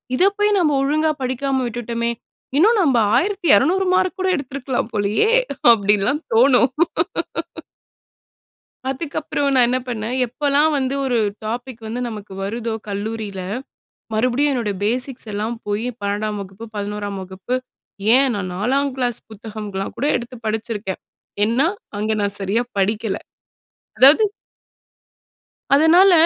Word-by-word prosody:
இத 305 - +3
போய் 415 0 +3
நம்ம 320 -4 +3
ஒழுங்கா 310 +3 +2
படிக்காம 260 +1 -1
விட்டுட்டோமே. 235 0 -2 0.5
இன்னும் 430 +8 +5
நம்ம 280 -8 +3 0.2
1,200 375 - +3
மார்க் 370 - +1
கூட 375 - +1
எடுத்திருக்கலாம் 260 -3 -3
போலயே." 210 - +2 0.4
அப்டின்னுலாம் 210 +6 +2
தோணும். 250 +1 +5 2.2
அதுக்கப்புறம் 285 0 -2
நான் 250 -2 +5
என்ன 255 +1 +1
பண்ணேன் 235 +1 -3
எப்போலாம் 290 +5 +2
வந்து 265 -1 -1
ஒரு 250 -3 +1 0.3
டாபிக் 240 +2 -5
வந்து 230 +3 -4
நமக்கு 210 -3 -8
வருதோ 225 +2 -3
கல்லூரியில 205 -1 -4 0.7
மறுபடியும் 255 +6 +2
என்னோட 235 -6 -1
பேசிக்ஸ் 245 +2 -2
எல்லாம் 215 +3 -2
போய் 210 +3 -1
12ம் 205 +1 -2
வகுப்பு, 195 +3 -9
11ம் 205 -1 -4
வகுப்பு 190 +6 -5 0.6
ஏன் 265 0 +4
நான் 190 -3 -3
4ங்கிளாஸ் 255 +3 0
புத்தகம்லாம் 210 -2 -6
கூட 280 - -1
எடுத்து 240 +1 -6
படிச்சிருக்கேன். 215 -3 -3 0.4
ஏன்னா, 235 +7 +2 0.3
அங்க 215 +1 0
நான் 200 0 +1
சரியா 200 +5 +1 0.2
படிக்கல. 210 +1 0 0.8
அதாவது. 285 +11 +8 1.5
அதனால 340 +6 +6
240 Hz, 115 wpm, -20 LUFS, 210-275 Hz, 2.2 s, அதாவது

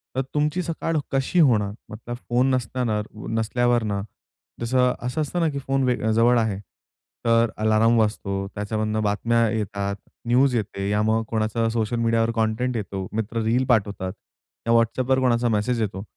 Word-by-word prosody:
तर 130 - +1
तुमची 150 +4 +1
सकाळ 165 -1 -2
कशी 135 +6 +1
होणार? 110 -9 +4 0.2
मतलब 115 +3 -6
फोन 125 +2 +3
नसताना, 120 -3 -1 0.4
नसल्यावरनं, 115 -3 +1 0.6
जसं 125 +1 +2
असं 155 +5 -1
असतं 165 +4 -2
ना, 165 - +2
की 140 -1 -4
फोन 135 0 0
वे 125 -1 +2 0.2
जवळ 120 +2 +4
आहे, 105 -3 -1 0.7
तर 115 0 +4
अलार्म 110 +2 +3
वाजतो, 105 -2 0 0.2
त्याच्यामधून 110 +1 -1
बातम्या 115 +3 +2
येतात, 100 -2 -2 0.3
न्यूज 125 +1 +3
येते, 100 -2 -2
या 105 0 +2
मग 110 +1 +2
कोणाचा 110 0 0
सोशल 115 0 -1
मीडियावर 115 0 +2
कंटेंट 115 +3 0
येतो, 95 -2 -4
मित्र 110 +1 -2
रील 120 +4 +2
पाठवतात. 100 -5 +1 0.5
या 115 - +4
WhatsAppवर 125 +3 +2
कोणाचा 120 -2 +2
मेसेज 115 +2 0
येतो. 95 -2 -3
115 Hz, 150 wpm, -24 LUFS, 110-125 Hz, 0.7 s, होणार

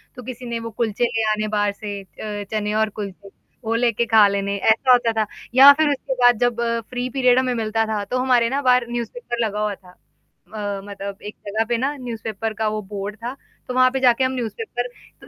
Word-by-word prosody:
तो 250 - -9
किसी 250 +1 -8
ने 235 -1 -3
वो 230 0 -6
कुलचे 225 +1 -1
ले 230 -2 -1
आने 215 0 -1
बाहर 205 -1 +1
से 205 0 -6
अ, 205 +1 -7
चने 210 -1 -1
और 220 0 +2
कुलचे, 200 -1 -8 0.3
वो 225 0 -1
लेके 235 0 +1
खा 220 -2 +6
लेने 200 0 -1
ऐसा 225 +6 +3
होता 240 -2 +4
था। - - -5 0.3
या 275 +2 +11
फिर 305 +1 +2
उसके 270 -1 -2
बाद 245 -2 +6
जब 245 -1 +1 0.3
फ्री 250 0 -3
पीरियड 255 -1 +3
हमें 255 -1 0
मिलता 225 -1 0
था, 215 -2 -2
तो 250 +5 -2
हमारे 250 -2 +3
ना 275 +3 -1
बाहर 250 -2 +4
न्यूज़ 240 -1 -3
पेपर 240 - -3
लगा 210 -1 -3
हुआ 210 -1 -1
था। 185 -1 -18 0.6
अ, 205 -2 -4
मतलब 200 -1 -7
एक 210 - -8
जगह 215 +2 0
पे 240 - +2
ना 275 +5 -1
न्यूज़ 240 -4 -6
पेपर 220 0 -3
का 220 0 -1
वो 215 0 -3
बोर्ड 205 0 -5
था, 240 +3 -6 0.3
तो 250 - -4
वहाँ 255 0 +5
पे 265 - -1
जाके 255 0 +4
हम 260 - +1
न्यूज़ 240 -4 -3
पेपर 245 - -3 0.3
त - - -14
230 Hz, 230 wpm, -22 LUFS, 210-250 Hz, 0.6 s, या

